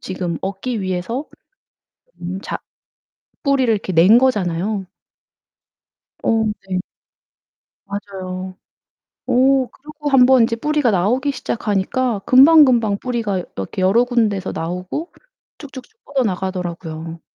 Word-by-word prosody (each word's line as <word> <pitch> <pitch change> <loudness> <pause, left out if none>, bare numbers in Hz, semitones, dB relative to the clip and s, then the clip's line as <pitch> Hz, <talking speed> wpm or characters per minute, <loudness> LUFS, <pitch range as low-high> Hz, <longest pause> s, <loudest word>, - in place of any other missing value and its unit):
지금 180 -3 -4
얻기 200 +5 -3
위해서 190 +9 -3 0.9
음 180 +2 -4
자 - - -4 0.9
뿌리를 270 -4 +2
이렇게 200 -3 -2
낸 185 +7 +6
거잖아요. 205 -5 0 1.4
어 225 -1 +2 0.2
네. 185 -1 -1 1.1
맞아요. 190 -2 -6 0.7
어 260 +1 +3
그러고 300 +1 -7
1 265 -3 +6
번 260 -1 +5
이제 230 0 -1
뿌리가 295 0 +1
나오기 230 +9 +1
시작하니까 230 0 -1
금방금방 255 -7 +6
뿌리가 225 -6 -2
여 - - -7
이렇게 95 - -4
여러 205 +6 +4
군데서 220 -6 0
나오고 180 - -5 0.5
쭉쭉쭉 290 - -12
뻗어 275 -2 -1
나가더라고요. 175 -4 -4
215 Hz, 255 characters per minute, -19 LUFS, 185-260 Hz, 1.4 s, 낸